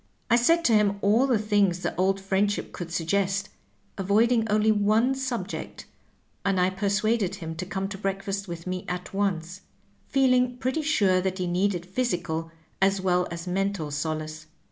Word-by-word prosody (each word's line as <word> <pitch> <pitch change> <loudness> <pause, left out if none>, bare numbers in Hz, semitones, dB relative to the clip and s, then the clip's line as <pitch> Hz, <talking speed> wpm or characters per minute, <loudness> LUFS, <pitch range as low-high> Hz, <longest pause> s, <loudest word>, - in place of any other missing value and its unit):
I - - +7
said 330 +8 +3
to 235 - +4
him 205 -2 +3
all 220 +7 +4
the 250 -4 +3
things 205 -4 +1
that - - -2
old 195 +1 +1
friendship 195 +1 0
could 170 -2 -6
suggest, 195 +3 0 0.5
avoiding 225 +4 +3
only 215 +1 +3
one 215 +5 +3
subject, 245 -8 -4 0.6
and 195 -2 +1
I 180 +1 +3
persuaded 205 +1 0
him 160 -1 -6
to 185 +1 -5
come 190 +1 -2
to 195 -2 -7
breakfast 195 0 -3
with 170 -1 -7
me 185 0 -3
at 180 +1 -5
once, 185 -2 -2 0.5
feeling 255 -2 +2
pretty 260 +5 -1
sure 200 -12 +2
that 190 0 -2
he 185 - -2
needed 180 0 0
physical 175 -6 -2 0.3
as 195 0 +3
well 180 -1 +1
as 170 0 -6
mental 190 -4 -1
solace. 155 +1 -4
195 Hz, 165 wpm, -26 LUFS, 180-215 Hz, 0.6 s, I